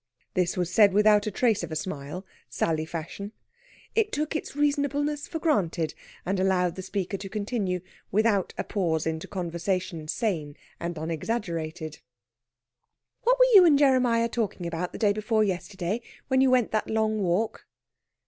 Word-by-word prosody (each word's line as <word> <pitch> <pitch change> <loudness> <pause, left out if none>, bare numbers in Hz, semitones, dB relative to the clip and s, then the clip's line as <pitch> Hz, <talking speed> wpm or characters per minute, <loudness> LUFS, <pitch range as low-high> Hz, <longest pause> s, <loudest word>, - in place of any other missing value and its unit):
This 180 0 0
was 180 -1 -1
said 205 -2 +6
without 210 0 +5
a - - +2
trace 220 +1 +1
of 170 -2 -6
a - - -3
smile, 155 +2 -5 0.2
Sally 160 -1 0
fashion. 175 +6 -6 0.6
It 435 -1 +2
took 305 -1 -2
its 305 - -4
reasonableness 290 0 0
for 330 - -4
granted, 180 - 0 0.3
and 190 +1 0
allowed 185 -2 +2
the 190 - -6
speaker 195 +1 -3
to 195 0 -7
continue 200 -3 -2 0.3
without 210 -2 +2
a - - -1
pause 165 -6 -1
into 160 0 -3
conversation 175 -2 -3
sane 155 -7 -2 0.2
and 170 -1 -4
unexaggerated. 160 -1 -3 1.3
"What - - +5
were - - +7
you 390 -3 +10
and 315 -5 +6
Jeremiah 255 -5 +4
talking 220 -6 -3
about 170 +1 -3
the - - -7
day 205 -3 +3
before 215 +1 +1
yesterday, 195 +2 -2 0.3
when 260 -1 +4
you 265 - +5
went 250 -3 +3
that 215 - -1
long 220 -1 +1
walk?" 195 +3 -1
200 Hz, 160 wpm, -27 LUFS, 170-230 Hz, 1.3 s, you